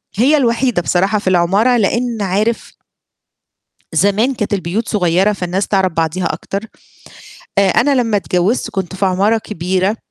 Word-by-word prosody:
هي 265 Hz, +9 st, +3 dB
الوحيدة 240 Hz, -5 st, +1 dB
بصراحة 195 Hz, +5 st, +1 dB
في 200 Hz, -, -9 dB
العمارة 195 Hz, +8 st, +2 dB
لإن 235 Hz, +1 st, 0 dB
عارف 205 Hz, +4 st, -1 dB, 1.2 s
زمان 210 Hz, +7 st, +2 dB
كانت 210 Hz, -3 st, -3 dB
البيوت 200 Hz, +4 st, -2 dB
صغيرة 190 Hz, 0 st, +2 dB
فالناس 185 Hz, 0 st, -2 dB
تعرف 190 Hz, -2 st, +1 dB
بعضيها 165 Hz, +2 st, -1 dB
أكتر. 195 Hz, -, -4 dB, 1.0 s
آآ 200 Hz, -1 st, +4 dB
أنا 275 Hz, +9 st, +2 dB
لمّا 230 Hz, -5 st, +1 dB
اتجوِّزت 195 Hz, +4 st, 0 dB
كنت 190 Hz, -2 st, -4 dB
في 195 Hz, +1 st, 0 dB
عمارة 200 Hz, +4 st, +2 dB
كبيرة 190 Hz, 0 st, -2 dB
200 Hz, 135 wpm, -16 LUFS, 185-225 Hz, 1.2 s, آآ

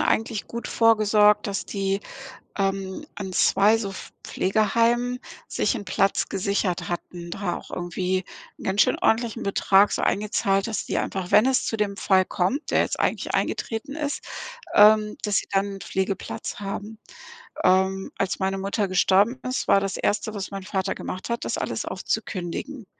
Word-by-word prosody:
eigentlich 220 Hz, -1 st, 0 dB
gut 235 Hz, 0 st, -6 dB
vorgesorgt, 210 Hz, -2 st, +4 dB
dass 200 Hz, -2 st, -3 dB
die, 195 Hz, -1 st, -1 dB, 0.6 s
ähm, 195 Hz, +4 st, -2 dB
an 190 Hz, -2 st, -5 dB
2 195 Hz, +4 st, +4 dB
so 200 Hz, -3 st, -3 dB
Pf 190 Hz, -, -9 dB
Pflegeheimen 230 Hz, +5 st, +1 dB, 0.3 s
sich -, -, 0 dB
'n 215 Hz, -4 st, -5 dB
Platz 195 Hz, 0 st, +1 dB
gesichert 195 Hz, -2 st, -1 dB
hatten, 175 Hz, 0 st, -6 dB
da 175 Hz, -2 st, -2 dB
auch -, -, -11 dB
irgendwie 180 Hz, +1 st, -2 dB, 0.3 s
'n -, -, -11 dB
ganz 190 Hz, +2 st, +1 dB
schön -, -, +1 dB
ordentlichen 225 Hz, 0 st, +1 dB
Betrag 200 Hz, 0 st, +4 dB
so -, -, -1 dB
eingezahlt, 195 Hz, -1 st, +1 dB
dass 225 Hz, -2 st, -3 dB
die -, -, -1 dB
einfach, 185 Hz, -2 st, -3 dB
wenn 210 Hz, +4 st, +6 dB
es 265 Hz, -1 st, +2 dB
zu 225 Hz, -, -1 dB
dem 205 Hz, -2 st, -1 dB
Fall 190 Hz, -1 st, +3 dB
kommt, 200 Hz, -, -1 dB
der -, -, +3 dB
jetzt -, -, -3 dB
eigentlich -, -, -1 dB
eingetreten 235 Hz, +5 st, -2 dB
ist, 295 Hz, -2 st, -2 dB, 0.5 s
ähm, 210 Hz, 0 st, +6 dB
dass 205 Hz, -2 st, +1 dB
sie -, -, 0 dB
dann 195 Hz, 0 st, 0 dB
’n 195 Hz, -, -9 dB
Pflegeplatz 190 Hz, +1 st, -3 dB
haben. 205 Hz, +2 st, -5 dB, 0.7 s
Ähm, 190 Hz, +1 st, +2 dB
als 195 Hz, -, -1 dB
meine 195 Hz, 0 st, 0 dB
Mutter 200 Hz, +1 st, -1 dB
gestorben 195 Hz, +6 st, +3 dB
ist, 255 Hz, +1 st, -2 dB
war 195 Hz, -, +6 dB
das 195 Hz, 0 st, -2 dB
1. 215 Hz, +1 st, 0 dB
was 195 Hz, -2 st, -5 dB
mein 195 Hz, -1 st, -6 dB
Vater 190 Hz, -1 st, -2 dB
gemacht 185 Hz, -, -6 dB
hat, 235 Hz, 0 st, -2 dB
das -, -, -2 dB
alles -, -, -3 dB
aufzukündigen. 210 Hz, +7 st, -4 dB
200 Hz, 165 wpm, -24 LUFS, 190-220 Hz, 0.7 s, wenn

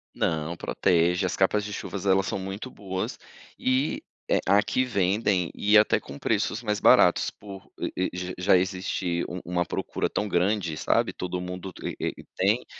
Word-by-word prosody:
Não, 80 Hz, +1 st, -1 dB
protege. 90 Hz, +3 st, +2 dB
As 90 Hz, -, -1 dB
capas 105 Hz, +2 st, +2 dB
de 105 Hz, -, -6 dB
chuvas 100 Hz, -1 st, -5 dB
elas 95 Hz, 0 st, +3 dB
são -, -, -2 dB
muito 95 Hz, +6 st, -6 dB
boas 95 Hz, -2 st, -4 dB, 0.4 s
e 130 Hz, +3 st, 0 dB, 0.3 s
eh, -, -, +3 dB
aqui, 105 Hz, +5 st, +3 dB
vendem 100 Hz, -5 st, +1 dB
e 105 Hz, +1 st, +4 dB
até 105 Hz, -, +4 dB
com 70 Hz, -, -10 dB
preços 110 Hz, +5 st, -1 dB
mais 105 Hz, -2 st, -1 dB
baratos -, -, +5 dB
por 100 Hz, -1 st, -12 dB
e 95 Hz, -, -2 dB
e -, -, -7 dB
já 90 Hz, 0 st, -4 dB
já 90 Hz, +1 st, +4 dB
existir 90 Hz, -2 st, -1 dB
um 90 Hz, -, -5 dB
uma 90 Hz, 0 st, 0 dB
procura -, -, -2 dB
tão 105 Hz, -, -2 dB
grande, 90 Hz, -2 st, 0 dB
sabe. -, -, +1 dB
Todo 90 Hz, 0 st, -4 dB
mundo 90 Hz, +1 st, -6 dB
te -, -, -6 dB
e -, -, -1 dB
e -, -, -17 dB
tem, 100 Hz, +6 st, +2 dB
95 Hz, 180 wpm, -26 LUFS, 90-105 Hz, 0.4 s, baratos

